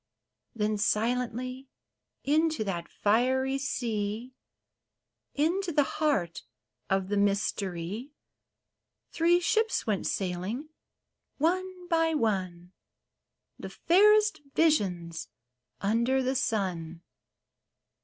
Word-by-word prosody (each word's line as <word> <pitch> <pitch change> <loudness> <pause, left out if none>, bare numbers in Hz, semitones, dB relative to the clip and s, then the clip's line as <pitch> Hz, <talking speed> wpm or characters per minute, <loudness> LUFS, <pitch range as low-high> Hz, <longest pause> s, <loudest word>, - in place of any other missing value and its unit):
Then 210 -1 0
silently 250 +4 -1 0.5
into 310 -3 +2
that 175 -4 -4
fiery 260 +5 +1
sea 230 -2 -3 0.5
— - - -57
Into 370 +1 -1
the 295 -2 +3 0.2
heart 190 - +1 0.5
of 195 -1 +1
the 205 - 0
mystery 200 - -1 0.5
— - - -56
Three 345 +1 +4
ships 445 +5 +1
went 210 -4 -1
sailing, 195 - -3 0.7
one 365 +3 -1
by 325 -2 +2
one. 185 - -1 0.9
The - - -6
fairest 425 +1 +4
visions 180 - +1 0.6
under 235 +6 +2
the 260 +1 0
sun. 180 -9 -2
235 Hz, 90 wpm, -28 LUFS, 195-310 Hz, 0.9 s, Three